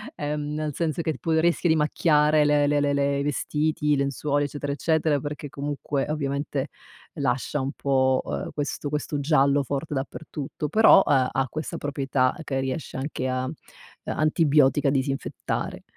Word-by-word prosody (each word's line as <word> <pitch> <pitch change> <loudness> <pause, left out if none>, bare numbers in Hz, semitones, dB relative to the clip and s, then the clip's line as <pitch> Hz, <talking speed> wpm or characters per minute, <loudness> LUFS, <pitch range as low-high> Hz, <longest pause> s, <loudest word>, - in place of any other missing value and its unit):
uhm, 150 0 -3
nel 155 -1 -2
senso 165 +1 -2
che 160 - 0
ti 145 - -7
può 165 - -1
rischi 170 +2 +2
di 160 - +4
macchiare 150 0 +3
le 145 0 +3
le 145 0 +2
le 145 0 +1
le 140 0 +1
i - - -1
vestiti, 150 +1 -1
i - - +5
lenzuoli, 140 +1 0
eccetera, 145 0 -4
eccetera, 155 0 +1
perché 145 +1 -6
comunque, 140 0 -3
ovviamente, 140 -1 -2 0.5
lascia 135 +2 -1
un 135 +1 -2
po', 130 -1 +2
uhm, - - -4
questo 145 0 -3
questo 150 0 -2
giallo 140 -1 +3
forte 140 +3 -3
dappertutto. 145 +2 -5
Però, 215 +1 +6
uhm, 130 -3 +3
ha 130 +2 0
questa 155 +5 -5
proprietà 135 -2 0
che 135 -3 -2
riesce 130 +2 -4
anche 135 -1 -3
a 130 0 -1 0.6
antibiotica 150 -3 +3
disinfettare. 135 0 -2
145 Hz, 160 wpm, -25 LUFS, 135-150 Hz, 0.6 s, Però